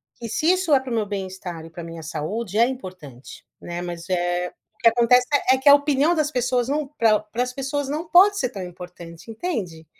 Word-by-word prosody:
que 230 -1 -8
se 310 +8 +1
isso 365 -5 +1
é 270 - +6
pra 260 -1 -8
o - - -1
meu 220 - 0
bem-estar 190 -4 -6
e - - -11
pra 170 +1 -9
minha 165 0 -8
saúde 195 +7 -4
é 235 - +6
importante, 180 - -9 0.2
né. 175 0 -6
Mas, 175 -1 -6
eh, 175 0 0
o - - -35
que - - +7
acontece 240 +2 +4 0.3
é 265 - +4
que 265 +2 -5
a 285 - +10
opinião 285 +2 +2
das 305 -2 +1
pessoas 250 -1 0
não 295 0 -1
pra 225 -7 +2
pra 215 +3 -5
as 250 - -4
pessoas 275 +1 -3
não 310 +4 -3
pode 395 +4 +6
ser 250 - 0
tão 200 -6 -7
importante, 175 0 -11
entende? 205 - -4
225 Hz, 220 wpm, -23 LUFS, 175-275 Hz, 0.3 s, a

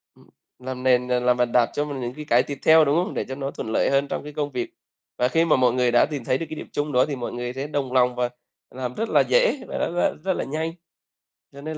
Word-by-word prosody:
Ừm, - - -22 0.3
làm 130 0 -6
nền 125 -1 +3
rồi 125 0 +1
làm 125 0 +2
bàn 125 -1 +1
đạp 120 -1 +3
cho 145 - -1
mình 140 -3 -5
những 120 0 -4
cái 150 0 -8
cái 120 -2 +4
tiếp 140 -1 -6
theo, 160 -1 +7
đúng 140 +2 +2
không? 180 +5 0
Để - - -2
cho 130 - -5
nó 135 0 -4
thuận 110 - -6
lợi - - +2
hơn 140 +1 +2
trong - - -4
cái 150 0 -9
công 145 -1 -3
việc. 125 -2 -3 0.5
Và 125 - +2
khi 165 +6 +2
mà 160 - +4
mọi 125 -2 +3
người 125 -1 +2
đã 120 - +5
tìm 145 -5 -5
thấy 130 - +1
được 165 - -4
cái - - -5
điểm - - -8
chung 145 +1 -2
đó 125 -1 +4
thì 145 - -4
mọi 120 -2 -5
người 120 0 -4
sẽ 135 +2 -4
đồng 140 -4 -3
lòng 125 -1 +3
và 125 0 0 0.4
làm 125 -1 -5
rất 225 - -3
là - - +5
dễ - - +2
và - - -5
nó - - -1
ra - - +3
rất 190 -1 +1
là - - -3
nhanh. 160 +4 -3 0.8
Cho 140 - -12
nên 155 +1 -5
135 Hz, 295 wpm, -24 LUFS, 125-150 Hz, 0.8 s, theo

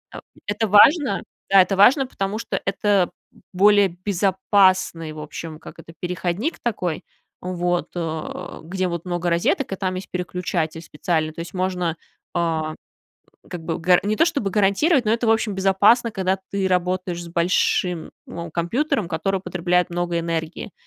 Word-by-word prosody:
Э, - - -6 0.3
это 210 +2 0
важно 210 - +5 0.3
да, 195 -1 +7
это 185 +1 0
важно, 260 +8 +6
потому 200 -2 -3
что - - -3
это 195 -2 +2 0.4
более 205 +2 +5 0.2
безопасный, 190 -4 +2
в 155 - -9
общем, 155 +1 -7
как - - -12
это, 165 - -12
переходник 180 - -2
такой, 185 -8 -2 0.4
вот, 175 -1 -1
э, 160 -2 -5
где 185 +3 -2
вот 170 0 -5
много 175 -1 -1
розеток, 170 +9 +1
и - - -1
там 185 -1 -2
есть 185 +1 -7
переключатель 180 -3 -3
специальный, 155 0 -2
то - - -11
есть 170 - -8
можно, 180 -3 -1 0.4
а, 160 -2 -1 0.7
как 175 -2 -7
бы 165 - -2
гар 180 +1 +4
не 210 +1 0
то 330 - +5
чтобы 280 - -1
гарантировать, 215 - +3
но 215 - +2
это, 230 0 0
в - - +5
общем, 220 -2 +1
безопасно, 200 +5 +4
когда 190 -2 0
ты 200 -1 -1
работаешь 180 -1 -1
с - - -9
большим, 170 0 0 0.2
ну, 170 0 -7
компьютером, 205 - -1
который 190 +4 -1
потребляет 180 -1 0
много 175 0 -1
энергии, 165 +3 -4
185 Hz, 160 wpm, -22 LUFS, 170-200 Hz, 0.7 s, да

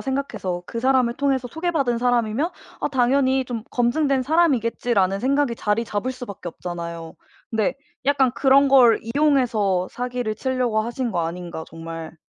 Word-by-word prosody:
생각해서 265 -10 -3
그 230 - -6
사람을 255 -1 +2
통해서 265 -2 0
소개받은 315 -6 -1
사람이면 245 +5 +1 0.3
'아 - - 0
당연히 265 0 +2
좀 235 -3 -5
검증된 265 +2 +1
사람이겠지.'라는 240 - +1
생각이 275 -1 +1
자리 210 +2 0
잡을 220 +4 -2
수 255 -1 -8
밖에 200 -5 -7
없잖아요. 170 -1 -7 0.4
근데 220 -3 0 0.3
약간 275 -2 +3
그런 275 +1 +4
걸 250 -4 +6
이용해서 230 -8 +1
사기를 245 -3 -3
치려고 250 -3 0
하신 240 +2 -3
거 170 -5 -1
아닌가 170 -1 -6
정말. 165 0 -8
245 Hz, 355 characters per minute, -22 LUFS, 205-270 Hz, 0.4 s, 걸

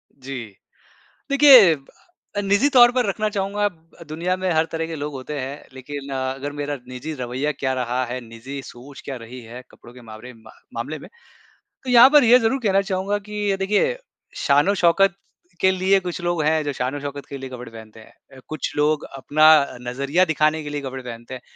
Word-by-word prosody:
जी, 135 0 -8 0.9
देखिए 270 - +8
अ, 205 - -10
निजी 200 +8 +2
तौर 245 -3 +7
पर 250 -2 0
रखना 210 +2 -1
चाहूँगा 205 0 -1
ब 165 -1 -18
दुनिया 170 +4 -2
में 185 0 -2
हर 160 0 +2
तरह 165 0 -2
के 165 - -6
लोग 150 -1 -5
होते 135 +2 -6
हैं, 135 +3 -6
लेकिन 140 +2 -8
अ, 130 0 -2
अगर 140 +2 -6
मेरा 145 0 -4
निजी 130 +5 -6
रवैया 130 +5 -2
क्या 130 -1 -2
रहा 125 0 -1
है, 125 +1 -5
निजी 120 +4 -9
सोच 135 +3 -12
क्या 135 - -5
रही 125 +2 -10
है 120 +2 -10
कपड़ों 120 - -16
के 125 - -14
मामरे 115 +2 -11
मामले 130 +9 -8
में, - - -13 0.8
तो 255 - -4
यहाँ 245 +2 +8
पर 295 -3 +6
ये 240 +2 +7
ज़रूर 255 +3 0
कहना 195 -3 +3
चाहूँगा 195 +1 -2
कि 210 0 -4
अ, 195 - +1
देखिए 205 - +1 0.4
शान-ओ-शौकत 175 +5 +3 0.5
के 190 - +4
लिए 190 +1 +2
कुछ 180 0 -5
लोग 175 -2 -1
हैं, 155 +1 +2
जो 145 - -2
शान-ओ-शौकत 140 +2 -5
के 140 - -7
लिए 135 0 -7
कपड़े 125 -2 -9
पहनते 110 -1 -12
हैं। 110 - -17 0.2
अ, - - -13
कुछ 155 -3 -4
लोग 150 0 +1
अपना 155 +3 +4
अ, 140 - -7
नज़रिया 140 +8 +1
दिखाने 155 -1 +1
के 145 - -7
लिए 145 0 -3
कपड़े 130 -1 -6
पहनते 120 0 -9
हैं। 125 - -10
150 Hz, 200 wpm, -22 LUFS, 130-195 Hz, 0.9 s, देखिए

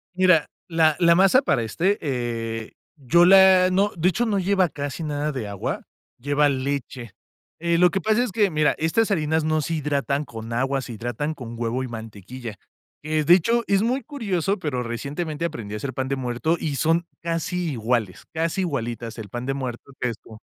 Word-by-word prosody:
Mira, 185 -4 +4 0.2
la 160 -2 +3
la 170 -1 +5
masa 195 +8 +5
para 135 - +1
este, 180 - 0
eh, 115 -5 -3 0.2
yo 155 +6 +4
la 190 -1 +7
no, 200 +2 +2
de 175 +3 +3
hecho, 235 +6 0
no 205 -2 +1
lleva 190 -1 +2
casi 145 +1 -5
nada 150 0 -2
de 130 -6 -4
agua, 100 -2 -4 0.3
lleva 145 +3 +2
leche. 130 -4 -3 0.5
Eh, 170 0 +1
lo 180 0 +6
que 195 - -1
pasa 220 +4 +2
es 245 - -3
que, 205 -3 +2
mira, 155 -1 +2
estas 210 +8 +1
harinas 160 -3 +1
no 155 0 +1
se 165 +3 -3
hidratan 145 -1 -1
con 115 -3 -8
agua, 135 +2 0
se 120 - -7
hidratan 120 +7 -3
con 120 -5 -8
huevo 120 +2 -1
y 130 - -3
mantequilla. 115 0 -8 0.4
Eh, 155 0 0
de 170 +4 +6
hecho, 230 +7 +3
es 200 0 +3
muy 250 +4 0
curioso 200 - -2
pero, 130 -7 -2
recientemente 145 +7 -4
aprendí 115 -11 -5
a 105 - -2
hacer 130 +3 -5
pan 130 0 -2
de 135 - 0
muerto 130 +6 -1
y 150 -3 -2
son 165 +5 +1
casi 170 0 -2
iguales, 115 -5 -1
casi 165 +4 -1
igualitas 120 -8 -3
el 110 -3 -7
pan 120 +4 -5
de 135 - -1
muerto, 130 0 -6
que 125 - 0
es 115 - -5
co 110 -1 -14
150 Hz, 195 wpm, -23 LUFS, 120-175 Hz, 0.5 s, la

